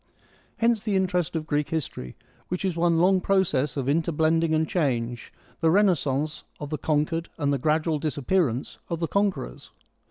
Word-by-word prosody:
Hence 230 Hz, -2 st, +2 dB
the 210 Hz, -2 st, -1 dB
interest 180 Hz, -3 st, 0 dB
of 155 Hz, -1 st, -2 dB
Greek 150 Hz, -2 st, -1 dB
history, 130 Hz, -, -4 dB, 0.3 s
which 180 Hz, +2 st, -3 dB
is 185 Hz, -3 st, 0 dB
one 170 Hz, 0 st, +2 dB
long 185 Hz, +2 st, +4 dB
process 160 Hz, -9 st, +1 dB
of 135 Hz, -2 st, -2 dB
inter 165 Hz, +4 st, +1 dB
blending 160 Hz, +1 st, +2 dB
and 155 Hz, 0 st, +1 dB
change: 120 Hz, -8 st, -1 dB, 0.3 s
the 165 Hz, -, +3 dB
renascence 155 Hz, -6 st, +1 dB, 0.2 s
of 145 Hz, 0 st, -6 dB
the 155 Hz, -, -2 dB
conquered 155 Hz, +3 st, 0 dB
and 145 Hz, -3 st, +1 dB
the 140 Hz, -, 0 dB
gradual 155 Hz, +2 st, +1 dB
dis 150 Hz, 0 st, -3 dB
appearance 140 Hz, -4 st, 0 dB
of 170 Hz, -, -2 dB
the 165 Hz, -, -1 dB
conquerors. 200 Hz, -, -2 dB
160 Hz, 170 wpm, -26 LUFS, 145-180 Hz, 0.3 s, long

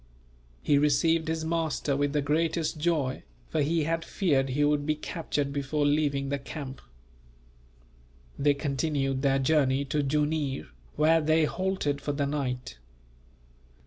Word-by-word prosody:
He 145 Hz, -, +4 dB
received 160 Hz, +3 st, +2 dB
his 160 Hz, 0 st, -2 dB
master 160 Hz, -3 st, -1 dB
with 145 Hz, 0 st, 0 dB
the 145 Hz, -1 st, 0 dB
greatest 160 Hz, +2 st, 0 dB
joy, 150 Hz, -5 st, 0 dB, 0.3 s
for 155 Hz, -, 0 dB
he 160 Hz, +2 st, +1 dB
had 165 Hz, +2 st, -1 dB
feared 140 Hz, -8 st, +1 dB
he 145 Hz, +3 st, +1 dB
would 145 Hz, 0 st, +2 dB
be 155 Hz, +1 st, 0 dB
captured 150 Hz, -3 st, -3 dB
before 145 Hz, +1 st, -1 dB
leaving 145 Hz, -2 st, +1 dB
the 140 Hz, 0 st, -1 dB
camp. 135 Hz, -1 st, -7 dB, 1.5 s
They 145 Hz, 0 st, +2 dB
continued 140 Hz, -1 st, -1 dB
their 135 Hz, -1 st, +3 dB
journey 135 Hz, -1 st, +2 dB
to 145 Hz, +2 st, 0 dB
Jooneer, 145 Hz, -, -1 dB, 0.3 s
where 160 Hz, +2 st, +4 dB
they 155 Hz, +1 st, +3 dB
halted 185 Hz, -5 st, -1 dB
for 145 Hz, -, -2 dB
the 140 Hz, 0 st, 0 dB
night. 125 Hz, -, -3 dB
145 Hz, 140 wpm, -28 LUFS, 140-160 Hz, 1.5 s, He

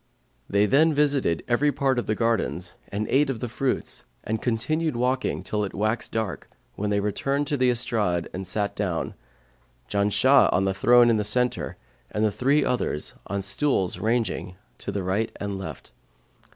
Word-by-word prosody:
They 100 Hz, +1 st, +3 dB
then 150 Hz, +7 st, +4 dB
visited 140 Hz, -, +1 dB
every 145 Hz, +5 st, +2 dB
part 135 Hz, -3 st, +1 dB
of -, -, -4 dB
the 110 Hz, -, +1 dB
gardens 110 Hz, -6 st, -1 dB
and 105 Hz, +2 st, -3 dB
ate 140 Hz, +1 st, +3 dB
of 130 Hz, -4 st, -2 dB
the 120 Hz, -, -3 dB
fruits 130 Hz, +3 st, -2 dB, 0.2 s
and 110 Hz, +1 st, -2 dB
continued 155 Hz, +6 st, 0 dB
walking 125 Hz, -4 st, 0 dB
till 105 Hz, +2 st, -1 dB
it 100 Hz, -, -5 dB
waxed 110 Hz, +3 st, -1 dB
dark, 110 Hz, -5 st, -3 dB, 0.2 s
when 105 Hz, +1 st, -3 dB
they 100 Hz, 0 st, +1 dB
returned 135 Hz, +8 st, -1 dB
to 145 Hz, -, +1 dB
the 130 Hz, -2 st, +3 dB
estrade 105 Hz, -8 st, 0 dB
and 95 Hz, 0 st, -5 dB
sat 100 Hz, +2 st, -1 dB
down, 90 Hz, -5 st, -2 dB, 0.7 s
Janshah 105 Hz, +7 st, +4 dB
on 95 Hz, +2 st, +2 dB
the 95 Hz, -, +1 dB
throne 120 Hz, +4 st, +5 dB
in 110 Hz, -, +3 dB
the 105 Hz, -, 0 dB
centre 125 Hz, +4 st, 0 dB, 0.3 s
and 105 Hz, +1 st, 0 dB
the 105 Hz, -, +2 dB
three 140 Hz, +7 st, +2 dB
others 120 Hz, -11 st, -2 dB
on 100 Hz, -, -2 dB
the 100 Hz, -, -3 dB
stools 100 Hz, -4 st, +1 dB
ranged 110 Hz, -4 st, -1 dB, 0.2 s
to -, -, -4 dB
the 100 Hz, -, -3 dB
right 100 Hz, +5 st, 0 dB
and 100 Hz, -1 st, -4 dB
left. 95 Hz, -, -8 dB
110 Hz, 180 wpm, -25 LUFS, 100-130 Hz, 0.7 s, throne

